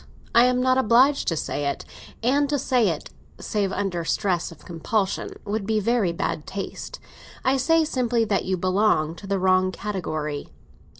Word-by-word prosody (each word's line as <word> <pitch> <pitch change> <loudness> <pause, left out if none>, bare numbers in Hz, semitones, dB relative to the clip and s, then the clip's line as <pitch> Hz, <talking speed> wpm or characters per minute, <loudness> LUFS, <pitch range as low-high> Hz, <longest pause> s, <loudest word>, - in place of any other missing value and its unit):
I 235 +1 +7
am 250 0 +2
not 255 +1 +3
obliged 260 +4 +4
to 165 - +1
say 145 -1 -2
it; 140 - -5 0.4
and 280 +4 +2
to 290 - +1
say 245 -5 +2
it, 160 - -5 0.3
save 200 -3 -1
under 190 -4 -2
stress 175 0 0
of 160 - -15
compulsion, 190 +4 -2
would 205 -1 -3
be 220 -1 +2
very 215 -3 +1
bad 160 -2 -3
taste. 200 - -6 0.5
I 265 +1 +3
say 325 +5 +3
simply 240 -5 +1
that 200 -2 0
you 185 0 0
belong 185 -3 +2
to 195 - -10
the 195 0 0
wrong 185 0 +3
category." 155 -7 -4
205 Hz, 170 wpm, -24 LUFS, 180-245 Hz, 0.5 s, I